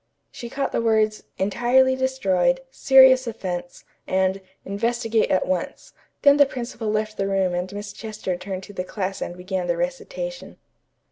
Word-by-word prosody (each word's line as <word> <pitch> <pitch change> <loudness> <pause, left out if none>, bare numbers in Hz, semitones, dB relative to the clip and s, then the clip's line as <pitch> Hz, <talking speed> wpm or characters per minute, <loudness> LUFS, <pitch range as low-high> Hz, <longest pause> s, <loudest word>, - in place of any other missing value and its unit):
She 235 - -8
caught 275 +2 -2
the - - 0
words 220 -2 +1
"entirely 245 +6 +3
destroyed," 260 -2 +1
"serious 265 -1 +6
offence" 180 -6 -5 0.2
and 190 +1 +1 0.2
"investigate 225 +2 0
at 185 - +2
once," 185 -2 -3 0.3
Then 285 0 +7
the 285 -1 +6
principal 235 -4 -5
left 215 0 -1
the 195 - -1
room 190 -2 +1
and 180 +1 -3
Miss 205 0 -7
Chester 215 -4 -4
turned 185 +1 -6
to 205 - -11
the 180 - -3
class 190 0 -4
and 175 - -5
began 185 0 -3
the 175 -1 0
recitation. - - -5
215 Hz, 155 wpm, -23 LUFS, 185-250 Hz, 0.3 s, Then